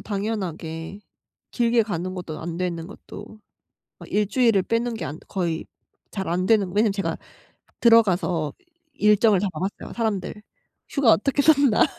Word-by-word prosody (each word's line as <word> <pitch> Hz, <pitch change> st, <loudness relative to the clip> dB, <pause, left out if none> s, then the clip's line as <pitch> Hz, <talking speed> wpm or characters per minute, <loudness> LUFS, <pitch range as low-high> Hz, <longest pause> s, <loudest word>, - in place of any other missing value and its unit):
당연하게 190 Hz, -5 st, -4 dB, 0.5 s
길게 235 Hz, -1 st, +2 dB
가는 185 Hz, -3 st, -4 dB
것도 170 Hz, -4 st, -6 dB
안 165 Hz, 0 st, -5 dB
되는 170 Hz, -2 st, -3 dB
것도 210 Hz, +2 st, -11 dB, 0.6 s
막 -, -, -11 dB
1 210 Hz, 0 st, +2 dB
주일을 230 Hz, -6 st, +3 dB
빼는 230 Hz, +3 st, -1 dB
게 220 Hz, -, -5 dB
안 155 Hz, -, -6 dB
거의 170 Hz, -4 st, -2 dB, 0.4 s
잘 190 Hz, -3 st, -4 dB
안 180 Hz, +2 st, 0 dB
되는 215 Hz, -4 st, +3 dB
왜냐하면 210 Hz, +2 st, +2 dB
제가 195 Hz, -1 st, -2 dB, 0.7 s
들어가서 185 Hz, -9 st, +3 dB, 0.4 s
일정을 210 Hz, -4 st, +4 dB
다 205 Hz, -, 0 dB
봐 155 Hz, -, -6 dB
봤어요. 190 Hz, +2 st, -5 dB
사람들 210 Hz, -3 st, -2 dB, 0.5 s
휴가 275 Hz, -6 st, +4 dB
어떻게 275 Hz, +7 st, +2 dB
썼나. 280 Hz, -6 st, +5 dB
205 Hz, 285 characters per minute, -24 LUFS, 180-225 Hz, 0.7 s, 썼나